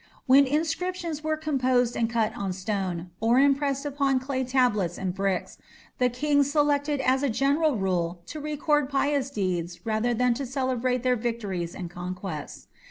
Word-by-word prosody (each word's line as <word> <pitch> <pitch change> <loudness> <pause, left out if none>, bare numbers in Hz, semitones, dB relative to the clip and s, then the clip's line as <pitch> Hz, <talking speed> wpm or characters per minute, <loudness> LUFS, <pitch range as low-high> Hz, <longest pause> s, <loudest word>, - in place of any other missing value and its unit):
When 270 +1 +6
inscriptions 325 +2 -2
were 310 0 0
composed 255 -5 +1
and 230 -1 0
cut 225 -1 0
on 195 -4 -3
stone, 185 -3 -3
or 230 +2 +3
impressed 275 0 +2
upon 275 -2 +1
clay 260 0 -2
tablets 245 -9 +1
and 185 -2 -2
bricks, 195 -1 -2 0.4
the 250 -1 +3
kings 285 +3 +1
selected 290 -1 +1
as 260 0 +2
a 285 - +1
general 280 +5 +2
rule 180 -3 -1
to 305 - -7
record 295 -1 0
pious 280 -1 +1
deeds 175 -6 -3
rather 225 +2 0
than 250 +1 +3
to 275 +4 -4
celebrate 255 -1 -1
their 250 -1 +3
victories 210 -7 -3
and 175 -2 -6
conquests. 180 -2 -6
255 Hz, 160 wpm, -26 LUFS, 195-285 Hz, 0.4 s, When